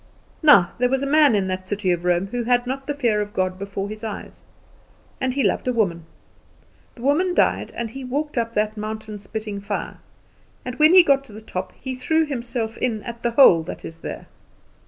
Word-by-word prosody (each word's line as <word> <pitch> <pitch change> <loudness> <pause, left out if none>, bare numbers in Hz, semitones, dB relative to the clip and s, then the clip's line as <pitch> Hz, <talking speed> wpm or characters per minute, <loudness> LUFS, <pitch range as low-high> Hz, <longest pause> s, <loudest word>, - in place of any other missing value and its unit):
Now, 280 - +6
there 250 0 +3
was 270 +1 0
a - - 0
man 290 -3 +5
in 195 -2 +1
that 185 0 -4
city 200 -2 0
of 175 0 -2
Rome 175 +1 +2
who 240 +5 -3
had 245 0 +2
not 270 +2 -4
the 290 - -1
fear 235 -7 +1
of 205 0 -6
God 185 0 -1
before 200 0 -4
his 215 +2 -8
eyes, 220 -2 -7 0.8
and 260 - 0
he 275 +1 0
loved - - 0
a 250 - +1
woman. 170 -8 -1 0.9
The 235 - -12
woman 350 +7 +2
died, - - +2
and 235 -2 -4
he 270 +2 -8
walked 290 +4 -3
up 230 -2 -1
that 215 0 0
mountain 215 0 -6
spitting 205 0 -6
fire, 200 +1 -4 0.7
and 250 - -4
when 310 +4 +6
he 365 - +10
got 275 -4 +3
to 220 - -14
the 215 - -9
top 185 -4 -5
he 260 - -5
threw 315 +6 +1
himself 240 -5 -4
in 220 -4 -1
at 235 -1 -8
the 240 - +1
hole 230 -9 +6
that 160 - -8
is 165 0 -9
there. - - -7
230 Hz, 215 wpm, -22 LUFS, 200-265 Hz, 0.9 s, he